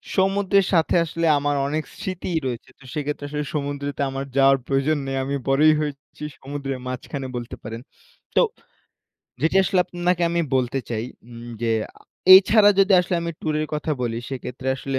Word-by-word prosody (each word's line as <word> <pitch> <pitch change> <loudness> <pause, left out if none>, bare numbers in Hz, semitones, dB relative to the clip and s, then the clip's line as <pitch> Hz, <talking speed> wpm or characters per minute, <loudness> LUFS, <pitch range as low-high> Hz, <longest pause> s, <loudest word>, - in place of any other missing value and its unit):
সমুদ্রের 195 0 +3
সাথে 165 -2 +3
আসলে 165 +1 -2
আমার 145 0 0
অনেক 155 +2 -1
স্মৃতিই 185 -3 -3
রয়েছে 120 -2 -4
তো - - -18
সেক্ষেত্রে 145 -1 -3
আসলে 150 0 -3
সমুদ্রেতে 145 -1 -3
আমার 135 +1 -4
যাওয়ার 135 0 +6
প্রয়োজন 140 +3 +1
নেই, 135 0 -2
আমি 140 +1 -2
বড়ই 150 +3 +5
হয়েছি 145 -1 -6 0.2
সমুদ্রের 135 -1 -5
মাঝখানে 130 +2 -5
বলতে 120 -1 -5
পারেন। 115 +1 -6 0.5
তো - - +6 1.0
যেটি 160 +6 +2
আসলে 190 0 +1
আপনাকে 175 0 -1
আমি 170 0 +1 0.2
বলতে 130 +1 0
চাই 115 -1 -2 0.3
উম 120 0 -10 0.2
যে 115 - +1 0.6
এই 190 - +12
ছাড়া 210 -2 +6
যদি 195 0 +5
আসলে 180 +1 -2
আমি 170 - -2
টুরের 155 -1 -1
কথা 150 +1 -3
বলি 115 -1 -2
সেক্ষেত্রে 130 0 -5
আসলে 135 0 -3
145 Hz, 165 wpm, -23 LUFS, 135-170 Hz, 1.0 s, এই